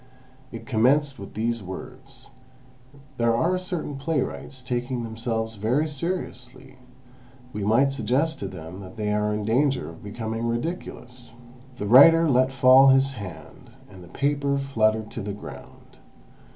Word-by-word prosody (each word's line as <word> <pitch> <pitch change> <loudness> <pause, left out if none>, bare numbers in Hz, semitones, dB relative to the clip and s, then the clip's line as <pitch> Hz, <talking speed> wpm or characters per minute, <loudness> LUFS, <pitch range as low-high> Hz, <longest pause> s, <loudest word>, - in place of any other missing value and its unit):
It 115 - -9
commenced 135 +3 +2
with 100 - -10
these 115 +1 -1
words: 130 +7 -10 0.9
"There 115 -1 +2
are 170 +9 +1
certain 175 -6 -4
playwrights 135 -3 -3
taking 125 -1 -3
themselves 115 -1 -4
very 125 +10 +1
seriously; 130 -5 -5 0.7
might 110 +6 +2
we 135 - -1
suggest 135 +6 0
to 100 - -4
them 90 -1 -9
that 95 +3 -11
they 105 -1 -1
are 105 0 0
in 105 0 -3
danger 130 - +1
of 80 - -13
becoming 110 +2 -4
ridiculous... 120 -3 -5 0.2
." 130 0 -22
The 105 - -4
writer 165 +9 +7
let 130 -1 +3
fall 130 +1 +6
his 135 0 +4
hand, 95 - -10 0.2
and 95 -2 -13
the - - -13
paper 140 +6 0
fluttered 110 -5 0
to 115 - -6
the 100 0 -4
ground. 70 -10 -12
125 Hz, 145 wpm, -24 LUFS, 110-135 Hz, 0.9 s, writer